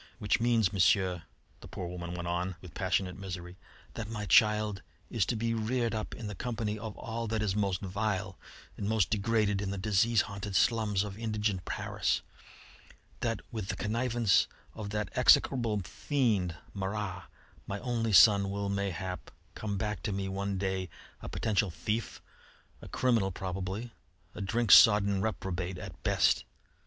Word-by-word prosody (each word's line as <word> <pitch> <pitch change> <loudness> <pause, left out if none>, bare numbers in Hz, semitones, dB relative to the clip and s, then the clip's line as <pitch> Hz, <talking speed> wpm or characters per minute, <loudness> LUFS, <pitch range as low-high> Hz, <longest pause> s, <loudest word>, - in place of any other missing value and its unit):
Which 105 -4 +1
means, 115 -4 +2
Monsieur," 95 -2 +3 0.4
the - - -11
poor 90 - -6
woman 85 0 -5
went 85 0 -4
on 90 +1 -1
with 90 -3 -12
passionate 95 0 -1
misery, 90 -1 -7 0.3
"that 110 -1 -5
my 105 -2 -4
child 105 +1 +4 0.3
is 110 -6 +1
to - - 0
be 115 +1 -1
reared 115 +1 0
up 110 -1 -4
in 120 - -7
the 105 - -4
company 110 -1 -3
of 110 -1 -7
all 115 -1 -4
that 110 0 -1
is 100 -2 0
most 100 -3 0
vile 95 -1 -2 0.4
and 100 - -2
most 110 -5 +2
degraded 105 -2 +1
in 100 - -2
the 100 - -3
disease 105 +3 +3
haunted 100 -1 -5
slums 105 -2 +2
of 105 0 -7
indigent 105 -4 -1
Paris; - - -1 1.0
that, 115 -1 -1
with 110 -4 -4
the 100 - -2
connivance 115 +1 +2 0.3
of 105 -2 -6
that 105 -2 -3
execrable 115 -6 +4
fiend 105 - 0 0.2
Marat, 100 -1 -3 0.4
my 100 - -3
only 115 -3 -1
son 100 +1 +7
will, 100 0 -2
mayhap, 95 -2 -3 0.2
come 105 -2 -3
back 105 -3 -2
to 110 - -2
me 95 0 -2
one 100 +1 -2
day 95 -1 -2 0.3
a - - -6
potential 105 -2 0
thief, 105 +8 -3 0.6
a - - -10
criminal 115 -6 +1
probably, 95 +5 -4 0.4
a - - -7
drink 110 +2 0
sodden 100 -3 +7
reprobate 95 -3 -3
at - - -9
best. - - +3
100 Hz, 160 wpm, -30 LUFS, 95-110 Hz, 1.0 s, son